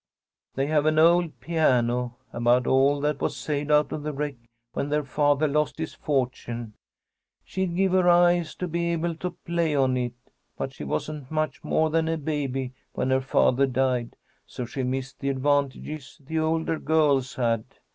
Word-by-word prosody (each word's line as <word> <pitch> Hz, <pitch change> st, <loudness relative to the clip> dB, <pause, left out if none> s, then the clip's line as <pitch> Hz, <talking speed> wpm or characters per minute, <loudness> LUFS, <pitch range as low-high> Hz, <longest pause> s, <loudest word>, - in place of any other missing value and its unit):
"They 135 Hz, -, +1 dB
have 150 Hz, 0 st, +2 dB
an 155 Hz, 0 st, +2 dB
old 170 Hz, +1 st, +4 dB
piano, 125 Hz, -6 st, +1 dB, 0.2 s
about 120 Hz, +1 st, +3 dB
all 140 Hz, +2 st, +3 dB
that 150 Hz, -1 st, -1 dB
was -, -, -1 dB
saved 150 Hz, -1 st, -2 dB
out 150 Hz, 0 st, +4 dB
of 150 Hz, -, -3 dB
the 150 Hz, +1 st, -3 dB
wreck 145 Hz, 0 st, -3 dB, 0.4 s
when 140 Hz, -, -2 dB
their 150 Hz, 0 st, +1 dB
father 145 Hz, +1 st, +2 dB
lost 150 Hz, +1 st, 0 dB
his 160 Hz, 0 st, -4 dB
fortune. 120 Hz, -5 st, -2 dB, 0.7 s
She'd 190 Hz, -2 st, -2 dB
give 190 Hz, +1 st, +2 dB
her 185 Hz, -1 st, +4 dB
eyes 175 Hz, -1 st, +4 dB
to 180 Hz, -, -3 dB
be 170 Hz, +1 st, -1 dB
able 170 Hz, +1 st, -1 dB
to 180 Hz, 0 st, -5 dB
play 170 Hz, -3 st, 0 dB
on 130 Hz, -2 st, +2 dB
it. 125 Hz, -1 st, -2 dB, 0.4 s
But -, -, -4 dB
she -, -, -8 dB
wasn't 145 Hz, -, -4 dB
much 155 Hz, -3 st, -2 dB
more 155 Hz, 0 st, +1 dB
than 160 Hz, 0 st, +1 dB
a 165 Hz, 0 st, 0 dB
baby 135 Hz, -4 st, -2 dB, 0.2 s
when 130 Hz, -, -1 dB
her 130 Hz, 0 st, +3 dB
father 135 Hz, 0 st, +3 dB
died, 125 Hz, -2 st, 0 dB, 0.3 s
so 125 Hz, -, -5 dB
she 130 Hz, +3 st, -4 dB
missed 130 Hz, +1 st, -3 dB
the 140 Hz, -, -1 dB
advantages 140 Hz, +1 st, -1 dB
the 160 Hz, +3 st, -1 dB
older 160 Hz, 0 st, 0 dB
girls 145 Hz, -5 st, +2 dB
had. 115 Hz, -3 st, +1 dB
145 Hz, 175 wpm, -26 LUFS, 130-160 Hz, 0.7 s, old